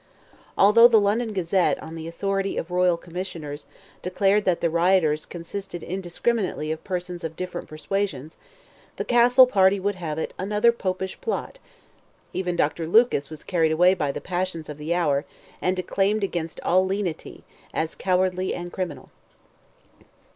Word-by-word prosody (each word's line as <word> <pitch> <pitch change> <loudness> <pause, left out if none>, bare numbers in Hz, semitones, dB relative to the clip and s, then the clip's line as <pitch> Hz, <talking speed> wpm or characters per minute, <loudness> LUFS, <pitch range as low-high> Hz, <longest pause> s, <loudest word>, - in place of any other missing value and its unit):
Although 210 +4 +8
the 230 -2 +5
London 215 +3 +1
Gazette, 185 -1 +1
on 160 - -8
the 165 0 -6
authority 195 +3 -2
of 165 - -4
royal 180 -1 +3
commissioners, 170 -4 -7 0.3
declared 195 +3 +1
that 180 -2 +2
the 170 - +1
rioters 170 -3 +2
"consisted 175 0 -6
indiscriminately 185 -2 -2
of 160 - -5
persons 180 -2 -4
of 160 0 -5
different 180 0 -5
persuasions," 155 -2 -3 0.6
the - - -4
Castle 245 +2 +6
party 195 -5 +3
would 205 +2 0
have 165 -5 -5
it 160 - -3
"another 210 +4 +3
Popish 190 -4 -4
plot." - - -4 0.7
Even 180 -2 -2
Dr. 160 0 0
Lucas 195 - +3
was 155 -2 -9
carried 165 -4 +1
away 180 +4 +5
by 150 -7 -1
the - - -5
passions 175 -3 -3
of 150 0 -8
the 150 +3 -4
hour, 150 -5 +1 0.4
and 185 +1 +1
declaimed 200 +3 0
against 170 -4 -3
all 185 +1 +3
lenity, 190 -3 -4 0.3
as 160 0 -2
cowardly 185 0 0
and 175 0 -7
criminal. 165 -8 -5
180 Hz, 150 wpm, -24 LUFS, 165-195 Hz, 0.7 s, Although